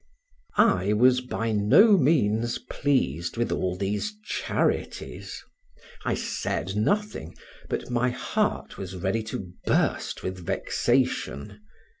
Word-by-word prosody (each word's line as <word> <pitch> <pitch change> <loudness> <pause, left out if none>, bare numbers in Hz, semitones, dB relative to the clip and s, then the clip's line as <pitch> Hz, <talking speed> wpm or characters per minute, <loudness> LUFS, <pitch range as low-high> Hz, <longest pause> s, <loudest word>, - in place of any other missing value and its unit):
I 95 +3 +4
was 125 +3 +4
by 115 -2 -2
no 110 - +6
means 120 - +2
pleased 85 - -1
with 120 - 0
all 90 -1 -1
these 105 - -2
charities; - - -2 0.6
I - - 0
said 95 - -3
nothing, 110 - -1 0.3
but - - -3
my 125 +1 +2
heart 125 - -2
was 95 -1 -6
ready 95 +5 -1
to 95 -4 -5 0.2
burst - - 0
with 95 -1 -4
vexation. 100 +3 -1
105 Hz, 110 wpm, -26 LUFS, 95-125 Hz, 0.6 s, no